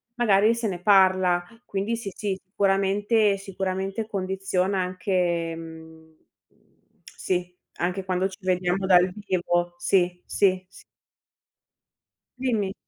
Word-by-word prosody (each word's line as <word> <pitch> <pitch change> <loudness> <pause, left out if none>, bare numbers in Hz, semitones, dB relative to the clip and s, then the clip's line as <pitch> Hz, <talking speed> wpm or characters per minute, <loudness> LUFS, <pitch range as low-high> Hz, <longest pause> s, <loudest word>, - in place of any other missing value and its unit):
magari 215 -2 +4
se 230 -1 -2
ne 180 -3 -4
parla. 185 -3 +4 0.2
Quindi 200 +3 -2
sì, 205 -4 -6
sì, 200 -3 -3
sicuramente, 200 +2 +2
sicuramente 195 +2 -3
condiziona 190 -1 -1
anche 180 -2 -1
mhmm 160 -1 -12 0.9
sì, 180 -1 -3 0.2
anche 180 +2 -2
quando 185 0 0
ci 190 - -11
vediamo 185 +1 0
dal 180 -1 +5
vivo. 175 -3 -1
Sì, 180 0 +1
sì 185 -2 +1
s - - -16 1.6
Dimmi. 220 -7 0
190 Hz, 105 wpm, -25 LUFS, 180-200 Hz, 1.6 s, dal